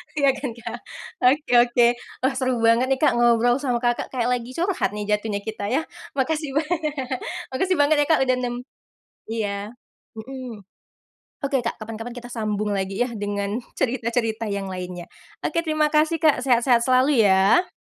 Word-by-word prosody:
Iya 280 -2 +4
kan, 260 -3 -5
Kak? 235 - -7 0.5
Oke 290 +1 +2
oke. 240 0 +4 0.4
Wah 265 - +3
seru 255 -1 +1
banget 230 +3 +4
nih, 270 - +2
Kak, - - +6
ngobrol 240 +2 +4
sama 250 -3 -1
Kakak, 240 0 +1
kayak 245 0 +1
lagi 245 +1 -3
curhat 350 - 0
nih 210 - -3
jatuhnya 210 -1 -1
kita 215 -2 -4
ya. 270 +8 +1 0.3
Makasih 290 +1 -1
banyak. 310 -1 -1 0.6
Makasih 370 +8 +1
banget 290 +1 +4
ya, 290 - +4
Kak, 320 - +4
udah 255 -1 +2
nem 245 -1 -2 0.7
iya. 205 -2 -3 0.5
Mhm. 240 -4 -8 0.8
Oke, 275 -1 +1
Kak, - - -2
kapan-kapan 225 +2 -6
kita 245 0 -8
sambung 215 -2 -2
lagi 195 +2 -2
ya - - -6
dengan 205 +2 -3 0.2
cerita-cerita 230 -2 -1
yang 200 -1 -2
lainnya. 180 -1 -6 0.4
Oke 335 - 0
terima 310 -1 +2
kasih, 310 +2 +3
Kak, 300 -5 +4
sehat-sehat 245 -1 +3
selalu 255 -2 +4
ya. 195 - +4
245 Hz, 160 wpm, -23 LUFS, 220-275 Hz, 0.8 s, Kak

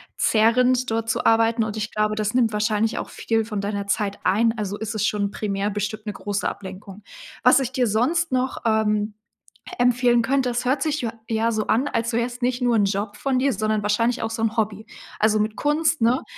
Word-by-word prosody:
zehrend 250 +3 +3
dort 225 0 -2
zu - - -1
arbeiten 225 0 +3
und 215 -1 -5
ich 215 +1 -4
glaube, 215 0 0
das 215 -1 -1
nimmt 235 -3 +2
wahrscheinlich 210 +1 0
auch - - -4
viel 225 -1 -1
von 210 -2 -4
deiner 200 0 -3
Zeit 200 0 -1
ein. 225 +3 +2
Also, 205 -1 -3
ist 220 +1 -4
es 215 - 0
schon 205 -2 0
primär 205 -1 -2
bestimmt 210 +1 -4
'ne 210 - -4
große 205 0 -3
Ablenkung. 195 +1 -8 0.4
Was 250 +3 +6
ich 260 -1 -3
dir 255 -2 +1
sonst 275 +11 +1
noch, 255 0 -1
ähm, 215 -1 +1 0.6
e 245 - -1
empfehlen 245 -1 +3
könnte, 260 +1 +1
das 245 +1 -2
hört 265 +2 +1
sich 305 +1 -1
jo 230 -2 -2 0.2
ja 225 0 +1
so 215 -1 -2
an, 255 +6 +2
als 230 -3 -2
wär's 240 +2 -2
nicht 245 +1 0
nur 245 -1 +2
'n 205 - +3
Job 200 +1 -2
von 270 -2 0
dir, 275 +1 +2
sondern 215 0 -1
wahrscheinlich 230 +4 +1
auch 225 - -2
so 225 0 -4
'n 225 0 0
Hobby, 215 -1 -1 0.3
also, 215 0 +3
mit 215 +1 -1
Kunst, 305 +1 +1
ne? 235 +3 +2
225 Hz, 215 wpm, -23 LUFS, 210-245 Hz, 0.6 s, Was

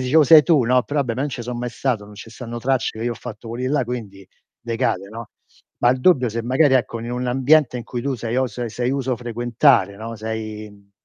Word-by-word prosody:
dicevo 150 +3 +5
sei 155 +2 +8
tu, 145 -5 +3
no, 125 +1 +3
però 145 +2 -1
vabbè 120 -5 -2
non 140 +4 -2
ce 125 -3 -6
so 125 +1 -5
mai 120 +1 -3
stato, 120 -6 -2
non 105 0 -14
ce 110 +2 -10
stanno 120 0 -7
tracce 125 -3 -1
che 115 - -4
io 120 - 0
ho - - -7
fatto 115 -1 -9
quelli 120 +3 -4
là, 140 -3 +1
quindi 105 -6 -7 0.3
decade, 105 -4 -2
no, 115 0 -9 0.5
ma 120 - +4
il 130 - -1
dubbio 130 -6 +4
se 115 +1 -3
magari 130 +3 +3
ecco 120 -2 0
in 120 +1 -6
un 125 0 -3
ambiente 135 +1 +3
in 120 - -6
cui 120 0 -5
tu 140 -1 -1
sei 115 +1 -4
o 130 0 +2
se 120 +1 -5
sei 120 +3 -2
uso 135 -2 -1
frequentare, 120 -3 +2
no, 115 +2 -7
sei, 110 -1 -5
mhmm 100 -1 -21
120 Hz, 245 wpm, -21 LUFS, 115-130 Hz, 0.5 s, sei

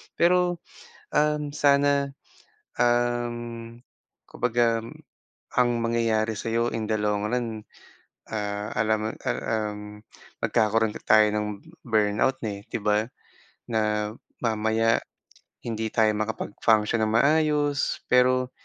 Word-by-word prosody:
Pero 175 0 +2 0.5
uhm, 150 -1 +1
sana 140 -1 +3 0.7
uhm, 120 -1 -1 0.5
kapagka 115 -2 +1 0.7
ang 125 -1 +4
mangyayari 115 -2 0
sa'yo 115 +2 0
in 110 - -2
the 110 0 -1
long 105 0 0
run 115 -3 -2 0.7
ah, 105 0 -3
alam 110 0 +2
mo 110 - -1 0.2
ah, - - 0 0.3
uhm, 105 0 -9 0.4
magkakaroon 110 -1 +1
tayo 110 0 +5
ng 105 0 0 0.4
burnout 110 +3 +1
eh, 100 -1 -5
di - - -2
ba? 105 0 +2 0.7
Na 105 -1 0 0.3
mamaya 110 0 +2 0.6
hindi 110 -1 -3
tayo 110 -1 +2
makapag-function 110 0 +1
ng 110 - 0
maayos 145 +1 +2
pero, 125 0 +3
115 Hz, 105 wpm, -25 LUFS, 110-125 Hz, 0.7 s, tayo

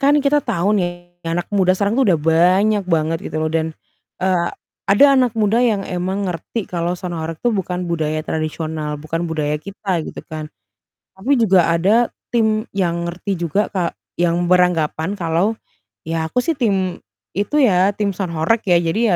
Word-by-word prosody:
kan 290 +1 +4
kita 290 +1 +2
tahu 205 -2 +1
nih 175 -1 -3 0.2
anak 165 +2 -2
muda 190 -3 +3
sekarang 200 +4 0
tuh 270 - +4
udah 155 - +1
banyak 185 +6 +3
banget 165 -2 0
gitu 155 0 -3
loh 155 - 0
dan, 160 0 -1 0.5
eee, 180 -2 +1 0.4
ada 205 +8 +6
anak 250 -3 +2
muda 220 +1 +2
yang 220 -5 +2
emang 190 +1 -2
ngerti 180 +6 -5
kalau 175 0 -1
sound 180 -2 -5
horeg 160 0 -5
tuh 240 - +3
bukan 180 -4 -2
budaya 155 -2 -1
tradisional, 155 -1 -3
bukan 165 +3 -3
budaya 150 -2 -1
kita 195 +1 -3
gitu - - -7
kan. 155 -1 -5 0.7
Tapi 215 +9 -2
juga 185 -6 +4
ada 205 +8 +3 0.2
tim 220 -1 +2
yang 170 -3 0
ngerti 180 +2 -4
juga 175 +5 0
ka 180 -4 -2 0.2
yang 175 0 +1
beranggapan 180 0 +2
kalau, 175 +5 0 0.5
"Ya 160 0 -2
aku 250 - 0
sih 325 -4 -1
tim 190 -7 0 0.4
itu 205 +9 -1
ya, 195 -2 +4
tim 205 -1 0
sound 180 -3 -4
horeg 210 +9 +2
ya, 180 - +4
jadi 195 +4 +1
180 Hz, 170 wpm, -19 LUFS, 165-205 Hz, 0.7 s, ada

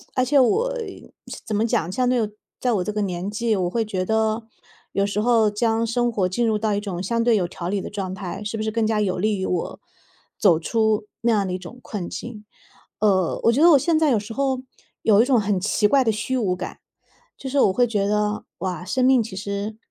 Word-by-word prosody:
而 255 - +3
且 275 +2 +3
我 455 - +2 0.7
怎 215 - -2
么 220 +2 +2
讲， 175 -6 0
相 250 +6 0
对 235 -4 +1 0.3
在 250 - +1
我 190 -4 +1
这 210 - -3
个 210 - -1
年 185 -1 -3
纪， 220 +1 0
我 180 -2 0
会 225 +4 0
觉 190 -4 -3
得， 220 +1 0 0.5
有 200 0 +1
时 205 +1 -2
候 225 -1 +3
将 225 +2 0
生 240 +1 0
活 190 -4 0
进 230 +6 0
入 220 -1 +2
到 215 0 0
一 200 - 0
种 195 -4 -5
相 230 +4 0
对 235 -1 +4
有 185 -4 +1
条 170 0 -6
理 195 +1 -1
的 - - -6
状 190 -2 -4
态， 190 +1 -6
是 210 +2 -4
不 215 - -2
是 220 - -1
更 225 0 0
加 215 -1 +1
有 185 -3 0
利 210 +3 0
于 190 - -2
我， 180 -2 -3 0.6
走 175 -6 +4
出 220 +3 +1 0.2
那 235 - +2
样 205 -3 +2
的 185 - -3
一 - - -1
种 185 +7 -11
困 195 -5 -5
境。 215 -3 -8 0.5
呃， 190 -5 +2
我 230 - +5
觉 270 - +1
得 340 +1 +8
我 290 - +8
现 325 +4 +2
在 315 -2 +3
有 225 - +3
时 215 +2 -8
候 265 -1 0 0.4
有 215 0 +5
一 - - +3
种 255 -4 +3
很 200 -2 0
奇 210 +2 +2
怪 270 +4 +4
的 225 - +2
虚 215 +5 -2
无 195 -7 0
感， - - -7 0.6
就 270 - -6
是 275 +1 +1
我 190 - +4
会 245 +5 +3
觉 205 -3 0
得， 210 0 0
哇， 180 -2 -4
生 255 +8 0
命 255 -1 +5
其 210 -3 -6
实 200 +2 -4
215 Hz, 260 characters per minute, -23 LUFS, 195-235 Hz, 0.7 s, 得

